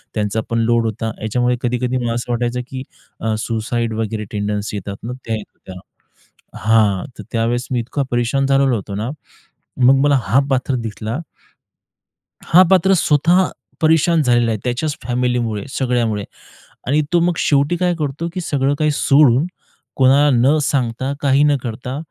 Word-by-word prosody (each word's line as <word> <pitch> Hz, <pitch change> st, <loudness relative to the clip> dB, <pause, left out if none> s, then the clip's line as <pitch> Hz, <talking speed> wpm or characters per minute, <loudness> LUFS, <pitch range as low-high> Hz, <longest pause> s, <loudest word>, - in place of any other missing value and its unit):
त्यांचा 105 Hz, +1 st, -1 dB
पण 115 Hz, 0 st, 0 dB
लोड 115 Hz, 0 st, +2 dB
होता. 110 Hz, 0 st, -3 dB
याच्यामुळे 125 Hz, +3 st, +1 dB
कधी-कधी 125 Hz, +1 st, -1 dB
मला 120 Hz, -2 st, -1 dB
असं 120 Hz, +1 st, -4 dB
वाटायचं 120 Hz, +1 st, -1 dB
की 130 Hz, 0 st, -6 dB, 0.4 s
अ, 110 Hz, -1 st, -1 dB
सुसाईड 115 Hz, 0 st, -2 dB
वगैरे 110 Hz, -1 st, -3 dB
टेंडन्सी 105 Hz, 0 st, -3 dB
येतात 100 Hz, 0 st, -6 dB
ना 120 Hz, +2 st, -4 dB
त्या 115 Hz, -1 st, -1 dB
येत 105 Hz, -, -8 dB
होत्या. 95 Hz, -, -12 dB, 0.8 s
हां, 110 Hz, -2 st, +2 dB
तर -, -, -6 dB
त्यावेळेस 120 Hz, +1 st, -1 dB
मी 125 Hz, -, +1 dB
इतका 135 Hz, +4 st, -2 dB
परेशान 120 Hz, +3 st, +1 dB
झालेलो 135 Hz, -2 st, +3 dB
होतो 100 Hz, -2 st, -5 dB
ना, 110 Hz, +4 st, -3 dB, 0.7 s
मग 135 Hz, +2 st, +6 dB
मला 145 Hz, -1 st, +4 dB
हा 115 Hz, +8 st, +3 dB
पात्र 130 Hz, 0 st, 0 dB
दिसला. 110 Hz, +4 st, -5 dB, 1.3 s
हा 180 Hz, +3 st, +6 dB
पात्र 190 Hz, +1 st, +4 dB
स्वतः 170 Hz, +3 st, +3 dB, 0.3 s
परेशान 160 Hz, +1 st, +3 dB
झालेला 120 Hz, -3 st, +2 dB
आहे 110 Hz, -, -1 dB
त्याच्याच 135 Hz, +5 st, -2 dB
फॅमिलीमुळे, 120 Hz, -3 st, -1 dB
सगळ्यामुळे 120 Hz, -6 st, -1 dB, 0.6 s
आणि 150 Hz, +4 st, +2 dB
तो 175 Hz, -, +4 dB
मग 175 Hz, -1 st, +1 dB
शेवटी 145 Hz, +4 st, +2 dB
काय 180 Hz, 0 st, +1 dB
करतो? 150 Hz, +3 st, -3 dB
की 185 Hz, -, -2 dB
सगळं 140 Hz, -3 st, 0 dB
काही 155 Hz, -1 st, +2 dB
सोडून 140 Hz, 0 st, +4 dB, 0.5 s
कोणाला 140 Hz, +2 st, +5 dB
न 135 Hz, +6 st, +3 dB
सांगता, 130 Hz, -1 st, -1 dB
काही 140 Hz, 0 st, +3 dB
न 145 Hz, -1 st, +3 dB
करता 125 Hz, +2 st, -5 dB
125 Hz, 155 wpm, -18 LUFS, 115-140 Hz, 1.3 s, मग